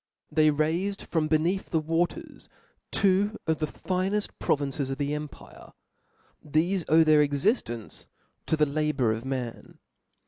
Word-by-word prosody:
They 155 0 +4
raifed 165 +7 0
from 160 -2 +1
beneath 165 +5 0
the 160 - +1
waters 165 +3 -2 0.4
two 200 +2 +2
of 160 -2 0
the 155 - 0
fineft 190 +5 -2
provinces 140 -1 -1
of 135 - -3
the 145 0 -1
empire; 150 -1 -8 0.7
thefe 165 +5 +1
owe 160 +2 +6
their 155 -1 +5
exiftence 145 - -1 0.4
to 160 - +1
the 150 - +4
labour 145 -5 0
of 115 +3 -6
man. 130 -3 -5
155 Hz, 135 wpm, -27 LUFS, 145-175 Hz, 0.7 s, owe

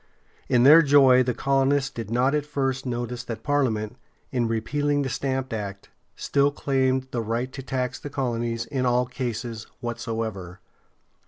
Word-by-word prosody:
In 120 -1 +4
their 155 +5 +9
joy 135 -4 +6
the 125 -2 0
colonists 135 0 +1
did 115 -4 -6
not 125 +4 +2
at 150 -1 +1
first 135 -2 -2
notice 120 0 -3
that 115 -2 -6
Parliament, 125 -6 0 0.3
in 120 -3 0
repealing 145 +6 0
the 135 - -2
Stamp 130 0 -2
Act, 100 -2 -6 0.2
still 140 0 +2
claimed 130 -2 0
the 120 - -1
right 115 +4 -3
to 135 - -6
tax 130 -1 -3
the 145 - -7
colonies 120 -4 -2
"in 130 -2 -1
all 125 +1 +2
cases 120 -2 -5
whatsoever." 115 -6 -4
125 Hz, 155 wpm, -25 LUFS, 115-135 Hz, 0.3 s, their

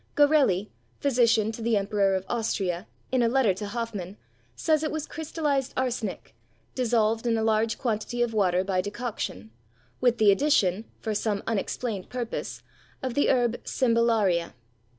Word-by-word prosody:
Garelli, 280 -10 +3 0.3
physician 230 -5 +3
to 225 - -8
the 225 -1 +2
Emperor 200 -1 +1
of 190 0 -3
Austria, 195 -5 -2 0.2
in 255 -1 +2
a 235 - +4
letter 245 -5 +3
to 205 +3 -6
Hoffmann, 210 -4 -5 0.4
says 310 -2 +2
it 310 - -1
was 310 0 -3
crystallised 295 -4 -2
arsenic, 240 - -3 0.4
dissolved 230 -2 +1
in 230 -1 +2
a 220 - 0
large 220 0 +1
quantity 240 0 -1
of 235 -1 -2
water 185 -4 +2
by 190 -1 0
decoction, 205 - -5 0.5
with 245 -1 +3
the 215 -2 +6
addition 210 -5 +2
(for 220 - -3
some 205 -1 -1
unexplained 220 -1 -3
purpose) 245 -2 -5 0.4
of 260 -2 -2
the 285 - +2
herb 240 -2 +1
cymbalaria. 230 - +1
225 Hz, 150 wpm, -26 LUFS, 200-250 Hz, 0.5 s, the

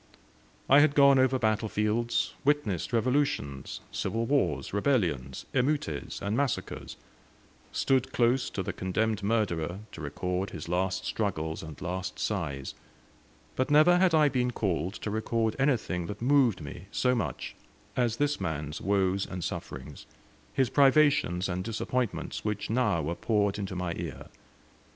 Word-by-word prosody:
I 140 - +7
had 145 0 +4
gone 140 -1 +7
over 130 0 +3
battlefields, 110 0 0
witnessed 140 - +1
revolutions, 120 - 0
civil 115 +1 -1
wars, 105 - 0
rebellions, 90 - 0
emeutes 130 - -1
and 100 +2 -1
massacres; 140 -1 -2 0.7
stood 130 -1 +1
close 120 +1 +2
to 95 - -3
the 100 +1 -3
condemned 105 +3 -1
murderer 100 -4 -1
to 85 - -9
record 90 +6 -2
his 80 -1 -7
last 90 +2 -1
struggles 80 -7 -2
and 80 -2 -9
last 90 +1 -4
sighs; 75 -10 -3 0.8
but 130 +2 0
never 155 +4 +6
had 180 -3 +4
I 155 -1 +5
been 125 -3 +1
called 95 -5 -1
to 105 - -4
record 110 +1 0
anything 115 -11 +1
that 105 - -6
moved 125 - +3
me 70 - -9
so 125 0 +1
much 120 - -3 0.4
as 120 -3 +1
this 145 0 0
man's 75 0 -3
woes 95 -1 +1
and 90 -2 -5
sufferings, - - -6 0.4
his 130 -3 +1
privations 140 - +4
and 90 0 -2
disappointments, 115 +1 -2
which 105 -1 -2
now 110 -9 +2
were 80 +4 -1
poured 105 +1 0
into 95 -2 -4
my 90 -1 -2
ear. - - -6
105 Hz, 140 wpm, -29 LUFS, 90-130 Hz, 0.8 s, I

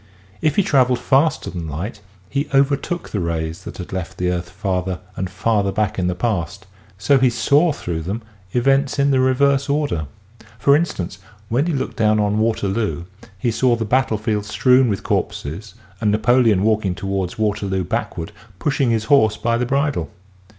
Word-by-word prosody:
If 155 -2 +1
he 200 - +3
traveled 130 -6 +3
faster 140 +6 +1
than 85 -2 -5
light 95 - -5 0.3
he 140 +5 -2
overtook 140 +5 +1
the 105 - -1
rays 85 +1 -3
that - - -8
had 90 0 -7
left 95 0 -5
the 90 0 0
earth 85 -1 -3
farther 95 -1 -2 0.2
and 95 -1 -3
farther 100 +1 0
back 105 -1 -1
in 90 - 0
the 90 - -1
past 100 -2 -2 0.3
so 135 +8 +3
he 130 -1 +4
saw 145 +7 +3
through 85 - -4
them 100 +8 -4 0.3
events 135 +4 +2
in 140 0 +3
the 130 - +3
reverse 135 +2 +2
order. 140 - 0 0.5
For 140 +6 +4
instance 145 - -2 0.3
when 135 +8 +1
he 170 - 0
looked 135 - -3
down 110 -1 +3
on 105 0 +1
Waterloo 105 -6 0 0.3
he 115 +5 0
saw 120 +2 +2
the 115 -1 -3
battle 125 -1 +1
field 105 -1 -2
strewn 125 +3 +3
with 100 -3 -2
corpses 90 +8 -3 0.2
and 110 - +1
Napoleon 110 -2 +3
walking 105 -4 +1
toward 95 -2 -3
Waterloo 100 -3 -1
backward 85 +1 -3 0.3
pushing 135 -1 0
his 115 -2 +1
horse 110 -3 +4
by 115 +2 0
the 120 +1 -1
bridle. 140 - 0
110 Hz, 175 wpm, -20 LUFS, 95-130 Hz, 0.5 s, he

